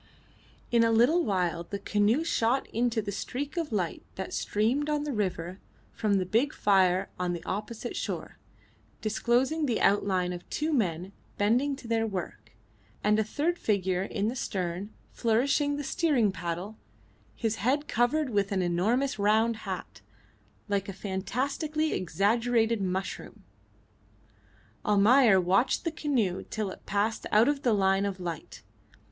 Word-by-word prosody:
In 235 -1 +5
a 230 - +3
little 250 +10 +4
while 180 -5 0
the 200 +4 -5
canoe 210 +8 +1
shot 260 -5 +1
into 230 -1 0
the 200 - -4
streak 275 - -4
of 330 -4 -2
light 185 -6 -1
that 190 - -5
streamed 245 +8 0
on 295 -1 0
the 295 -2 -3
river 185 -3 -2 0.3
from 215 -3 +1
the 190 -1 +1
big 235 +10 +1
fire 190 -1 +3
on 180 -1 0
the 170 - -6
opposite 215 +4 -4
shore, - - -4 0.6
disclosing 250 +8 +1
the 235 - 0
outline 190 -3 +2
of 175 - -9
two 310 +1 -1
men 185 - -1 0.2
bending 245 +8 +2
to 265 -3 -11
their 225 -1 +1
work, 190 -5 -6 0.5
and 210 +1 +3
a - - +3
third 310 +11 -1
figure 190 -3 0
in 200 +1 -2
the 235 - -2
stern 185 -3 -3 0.2
flourishing 275 +6 +1
the 290 - -3
steering 270 - +2
paddle, 180 +4 -5 0.6
his 225 -1 -1
head 275 +8 0
covered 250 +4 +1
with 200 -2 +1
an 190 -2 +1
enormous 215 +10 +1
round 220 +3 +3
hat, 220 - -7 0.7
like 200 -1 -1
a - - -4
fantastically 265 - -2
exaggerated 225 +5 +1
mushroom. 185 0 -4 1.4
Almayer 210 +1 +5
watched 185 +7 +2
the 330 - -1
canoe 250 - -1
till 215 -3 -3
it - - -13
passed 205 +3 -1
out 215 +3 +5
of 290 -1 +1
the 245 - +2
line 195 0 +2
of 195 -1 -5
light. 170 -4 -6
215 Hz, 150 wpm, -28 LUFS, 190-250 Hz, 1.4 s, In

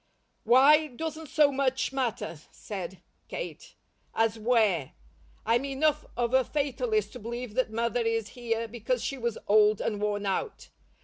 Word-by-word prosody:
"'Why' 295 +5 +6
doesn't 315 +4 -6
so 295 -2 +4
much 265 -1 0
matter," 230 - -2
said 190 -3 -7 0.2
Kate, - - -7 0.4
"as 225 0 +1
'where.' 215 - +2 0.5
I'm 230 +3 +2
enough 290 +2 0
of 240 0 0
a 260 0 +5
fatalist 305 - -1
to 250 - -8
believe 235 0 -6
that 255 +1 +1
Mother 235 +2 0
is 225 -2 -1
here 230 -2 -3
because 240 +2 -2
she 275 - -3
was 235 -2 -2
old 210 0 +5
and 210 -2 -2
worn 205 -1 -1
out. 410 - -3
240 Hz, 145 wpm, -28 LUFS, 220-275 Hz, 0.5 s, Why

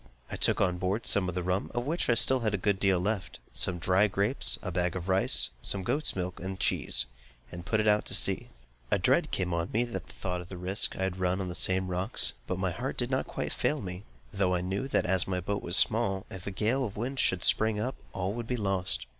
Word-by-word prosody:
I - - -3
took - - +3
on 90 -2 +1
board 95 +5 -2
some 95 -2 +3
rum 90 +2 -2
(of 120 0 -1
which 160 +1 -2
I 120 - +4
still 130 +2 +5
had 110 -4 0
a - - -1
good 100 +1 0
deal 95 -2 +2
left), 100 +2 -2
some 90 - +1
dry 95 +4 +3
grapes, 100 - +3
a 95 - -4
bag 90 0 -1
of 90 0 -5
rice, 95 0 +4
some 100 -1 0
goat's 140 +9 +2
milk, 90 -1 -4
and 95 +1 -6
cheese, - - +2 0.5
and 85 - -7
then 85 - -11
put 110 +1 0
out 105 0 +3
to - - +1
sea. - - +1 0.4
A - - +2
dread - - +2
came 90 -2 -2
on 85 +1 -2
me 115 +3 +1
at 120 - -7
the 95 - -2
thought 90 +1 -6
of 90 - -12
the 95 - -8
risk 95 +3 -1
I 95 - -3
had 95 -1 -3
run 90 +1 0
on 95 -2 -3
the - - -5
same 95 +4 +2
rocks; 90 +5 +1
but 90 - -2
my 95 -1 -1
heart 125 +8 -5
did 120 +1 -2
not 130 - -1
quite - - -4
fail 150 - -1
me, 90 -4 -6 0.3
though 95 -2 +1
I 90 - -1
knew 95 +8 -3
that, - - 0
as 95 -1 +1
my 90 -1 -1
boat 100 +3 -3
was 85 +1 +1
small, 95 -3 +3
if 95 -1 -9
a - - -2
gale 115 +7 0
of 105 -5 -5
wind 130 +5 -3
should 95 -2 +1
spring 110 -1 +2
up, 125 +5 -2 0.2
all 95 +1 -3
would 120 0 -6
be 125 - -2
lost. 90 - -1
95 Hz, 250 wpm, -29 LUFS, 90-110 Hz, 0.5 s, still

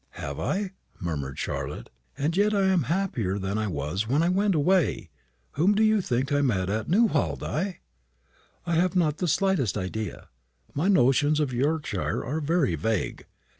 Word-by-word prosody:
"Have 70 0 -5
I?" 195 -1 -1 0.3
murmured 75 -8 -4
Charlotte; - - -4 0.3
"and 155 +4 0
yet 205 +2 +3
I 200 - +2
am 180 -7 +2
happier 145 - 0
than 100 +2 -2
I 110 - -1
was 85 +5 -2
when 140 +7 +2
I 170 - +2
went 195 +1 +2
away. 155 - +1 0.4
Whom 185 +8 +2
do 215 - +3
you 215 -1 +4
think 130 -3 -1
I 145 0 +3
met 100 -9 +1
at 110 +1 -2
Newhall, 195 -5 +2
Di?" 185 +3 -3 0.8
"I 170 - -1
have 180 +3 +2
not 160 -4 +1
the 180 - 0
slightest 165 - +1
idea. 100 +1 -5 0.4
My 155 +6 0
notions 145 -3 +4
of 145 -4 0
Yorkshire 150 +5 -1
are 155 +5 -2
very 155 - +1
vague. 100 +6 -2
145 Hz, 170 wpm, -26 LUFS, -, 0.8 s, you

